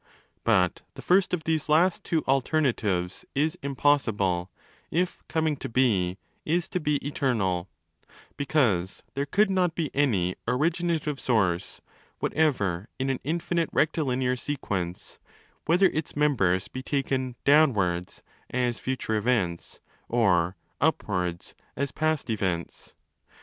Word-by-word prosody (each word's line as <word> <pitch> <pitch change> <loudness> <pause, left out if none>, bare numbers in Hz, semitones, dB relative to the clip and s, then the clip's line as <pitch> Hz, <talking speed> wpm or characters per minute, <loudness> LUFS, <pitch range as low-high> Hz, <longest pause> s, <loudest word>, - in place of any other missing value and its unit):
But 95 -6 +2
the - - -9
first 185 +1 +3
of 180 -3 -1
these 160 -1 -1
last 170 +4 +3
two 160 -2 0
alternatives 120 - 0
is 155 +4 +1
impossible 110 -10 +1 0.4
if 180 +3 -1
coming 160 -2 0
to - - -6
be 105 -8 +2 0.3
is 170 +2 0
to 180 - -1
be 150 -2 0
eternal, 100 -11 0 0.7
because 120 - +1
there 140 +1 -2
could 200 +6 +3
not 180 -3 +1
be 155 -5 -2
any 100 -11 +1
'originative 155 +2 0
source' 95 -7 0 0.4
whatever 105 - 0
in 135 +1 0
an 130 - -2
infinite 170 +2 -1
rectilinear 130 -5 +1
sequence, 100 -11 -4 0.5
whether 180 +4 +4
its 155 0 -3
members 105 -12 +2
be 130 - -6
taken 130 -2 -1
'down 150 +1 +6
wards' 90 -2 -2 0.3
(as 125 -2 -1
future 130 -4 -2
events) 105 -6 -1 0.3
or 95 -7 +2 0.3
'upwards' 90 -2 -1 0.2
(as 140 -1 -2
past 155 -1 0
events). 95 -5 -3
130 Hz, 120 wpm, -27 LUFS, 95-155 Hz, 0.7 s, down